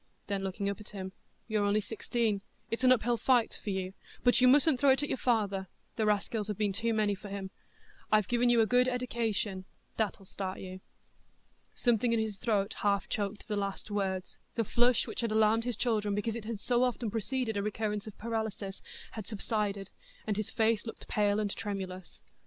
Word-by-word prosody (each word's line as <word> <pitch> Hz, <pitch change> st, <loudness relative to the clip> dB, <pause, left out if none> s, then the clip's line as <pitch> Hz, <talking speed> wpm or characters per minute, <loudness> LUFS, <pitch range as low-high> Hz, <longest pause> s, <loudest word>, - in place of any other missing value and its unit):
Then 200 Hz, -1 st, -2 dB
looking 195 Hz, +1 st, -2 dB
up 200 Hz, -1 st, -2 dB
at 210 Hz, -, -10 dB
him, 190 Hz, -2 st, -6 dB, 0.4 s
"You're 215 Hz, -2 st, +1 dB
only 205 Hz, +1 st, +3 dB
sixteen; 220 Hz, -1 st, -1 dB, 0.3 s
it's 230 Hz, +3 st, -1 dB
an 255 Hz, -, +7 dB
up 255 Hz, -, +4 dB
hill 240 Hz, +1 st, +2 dB
fight 240 Hz, 0 st, +2 dB
for -, -, -3 dB
you, 190 Hz, -1 st, -2 dB, 0.3 s
but 245 Hz, 0 st, +5 dB
you 255 Hz, -, +7 dB
mustn't 285 Hz, +1 st, +5 dB
throw 285 Hz, -, +5 dB
it 270 Hz, +2 st, +4 dB
at 290 Hz, -, -2 dB
your -, -, 0 dB
father; 200 Hz, -6 st, +1 dB, 0.3 s
the 220 Hz, -2 st, +1 dB
raskills 210 Hz, +1 st, 0 dB
have 210 Hz, -3 st, -3 dB
been 205 Hz, -2 st, +1 dB
too 230 Hz, +3 st, 0 dB
many 215 Hz, -2 st, +2 dB
for 200 Hz, +1 st, -8 dB
him. 195 Hz, -1 st, -5 dB, 0.6 s
I've 215 Hz, -3 st, +4 dB
given 240 Hz, 0 st, +3 dB
you 235 Hz, -1 st, +5 dB
a -, -, +5 dB
good 250 Hz, +2 st, +4 dB
eddication,—that'll 220 Hz, -5 st, -2 dB
start 190 Hz, 0 st, -4 dB
you." 185 Hz, 0 st, -7 dB, 0.9 s
Something 240 Hz, -1 st, +2 dB
in 230 Hz, -, +3 dB
his 215 Hz, -3 st, -2 dB
throat 210 Hz, -2 st, +1 dB
half 200 Hz, -1 st, +1 dB
choked 205 Hz, 0 st, -3 dB
the 210 Hz, -, -1 dB
last 200 Hz, +1 st, -3 dB
words; 190 Hz, -2 st, -2 dB, 0.2 s
the 230 Hz, -, +2 dB
flush, 240 Hz, +3 st, +3 dB
which -, -, -4 dB
had 230 Hz, -2 st, -1 dB
alarmed 220 Hz, +1 st, +4 dB
his 245 Hz, -2 st, -1 dB
children 210 Hz, -4 st, +1 dB
because 210 Hz, +2 st, -1 dB
it 230 Hz, -1 st, -6 dB
had 225 Hz, -2 st, -4 dB
so 245 Hz, +3 st, +2 dB
often 240 Hz, -3 st, 0 dB
preceded 230 Hz, +1 st, -1 dB
a 200 Hz, -, +1 dB
recurrence 210 Hz, 0 st, -2 dB
of 215 Hz, -, -9 dB
paralysis, 220 Hz, -3 st, -3 dB, 0.3 s
had 215 Hz, -4 st, -7 dB
subsided, 205 Hz, -2 st, -1 dB, 0.3 s
and 210 Hz, -, 0 dB
his 215 Hz, 0 st, -2 dB
face 220 Hz, -1 st, +2 dB
looked 225 Hz, -, -8 dB
pale 205 Hz, 0 st, +2 dB
and 205 Hz, -2 st, -1 dB
tremulous. 190 Hz, -3 st, -5 dB
215 Hz, 200 wpm, -31 LUFS, 200-230 Hz, 0.9 s, an